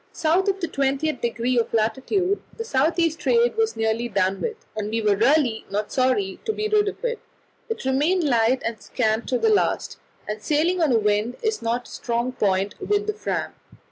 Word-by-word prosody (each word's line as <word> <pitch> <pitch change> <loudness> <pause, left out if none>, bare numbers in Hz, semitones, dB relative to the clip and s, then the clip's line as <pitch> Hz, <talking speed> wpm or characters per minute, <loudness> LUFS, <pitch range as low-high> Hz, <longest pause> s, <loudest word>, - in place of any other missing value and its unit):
South 340 +4 +1
of 390 -1 +1
the 340 - -2
20th 275 0 -1
degree 235 +1 0
of 230 - -1
latitude 270 - 0 0.2
the 455 - -3
south 320 -1 +1
east 330 -1 +1
trade 475 +4 +2
was 450 0 +1
nearly 225 +2 0
done 195 -2 0
with, 450 - -2 0.2
and 210 -1 -3
we 225 +1 -1
were 210 -2 +2
really 240 +1 +2
not 205 +1 -2
sorry 250 -7 +1
to - - 0
be 430 0 -2
rid 425 -1 +3
of 445 - -4
it; 475 -1 -1 0.5
it 450 - -4
remained 300 +8 +2
light 245 -2 +2
and 230 -2 -3
scant 220 -2 -1
to 250 - +2
the 445 - +2
last, 415 - 0 0.3
and 210 0 -4
sailing 325 - +1
on 310 -4 +3
a 235 - +4
wind 210 +3 0
is 440 -1 0
not 235 +1 -2
a - - -14
strong 235 +1 -2
point 200 -4 0
with 415 0 0
the 425 - -1
Fram. 430 - -3
260 Hz, 205 wpm, -23 LUFS, 225-370 Hz, 0.5 s, a